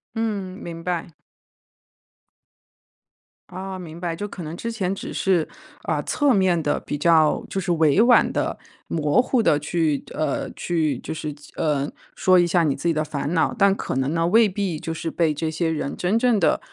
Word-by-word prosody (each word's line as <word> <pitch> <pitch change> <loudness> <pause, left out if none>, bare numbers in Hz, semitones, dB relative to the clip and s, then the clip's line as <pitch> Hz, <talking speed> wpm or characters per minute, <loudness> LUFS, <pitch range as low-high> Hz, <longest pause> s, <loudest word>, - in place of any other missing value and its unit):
嗯， 205 -5 -2
明 165 -1 -7
白。 175 -2 -3 2.4
哦， 190 0 -6
明 170 -2 -9
白， 170 -2 -3
就 205 - -4
可 195 -3 -8
能 160 +1 -6
之 230 +5 -4
前 195 -4 -1
只 - - -7
是 180 -5 +1 0.4
呃， - - -1
侧 290 -2 +2
面 190 -5 +3
地 145 - 0
比 145 - -4
较 160 0 +3
就 195 - -1
是 180 -1 -3
委 160 +1 +3
婉 240 +2 +5
地、 - - -1 0.3
模 150 +4 +2
糊 255 -1 +1
地 150 - +3
去 150 -1 0
呃， 155 -3 -2
去 155 -6 -1
就 - - -6
是 155 -2 -5 0.2
呃， 145 -2 0 0.3
说 185 -1 +4
一 175 - +4
下 170 0 +2
你 145 -3 +1
自 155 +6 -2
己 165 - +2
的 155 0 0
烦 145 0 -3
恼， 165 +8 +2
但 200 -3 +4
可 195 - -4
能 135 +4 0
呢， 165 0 +1
未 220 +3 +5
必 190 -4 -2
就 165 - -4
是 165 0 -4
被 160 -3 +1
这 160 +2 -2
些 165 +1 -1
人 150 -3 -3
真 190 +5 +1
正 235 -3 +2
地， 160 -4 +3
170 Hz, 205 characters per minute, -23 LUFS, 155-195 Hz, 2.4 s, 婉